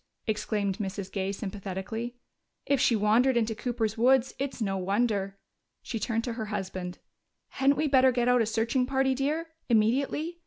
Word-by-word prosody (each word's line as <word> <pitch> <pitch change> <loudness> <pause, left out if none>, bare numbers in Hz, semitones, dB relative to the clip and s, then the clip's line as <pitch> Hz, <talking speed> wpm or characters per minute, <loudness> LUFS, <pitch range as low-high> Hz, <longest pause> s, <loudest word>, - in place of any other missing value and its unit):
exclaimed 210 -2 -1
Mrs. 195 -1 -4
Gay 195 -1 -2
sympathetically. 200 +4 -5 0.5
"If 280 -2 +2
she 235 - +4
wandered 225 +5 +3
into 225 -1 +1
Cooper's 225 -1 -2
woods, 260 +1 +4
it's 275 -1 -3
no 195 -4 -1
wonder." 195 0 0 0.5
She 230 - -4
turned 225 +2 -1
to 240 - -3
her 225 -1 -4
husband. 190 -3 -4 0.5
"Hadn't 275 +1 +2
we 305 +1 +1
better 260 -2 +5
get 245 -1 0
out 250 -1 +4
a 225 - +1
searching 230 +3 +1
party, 265 0 +2
dear, 300 +5 -1 0.2
immediately? 275 +9 +1
225 Hz, 160 wpm, -28 LUFS, 205-260 Hz, 0.5 s, better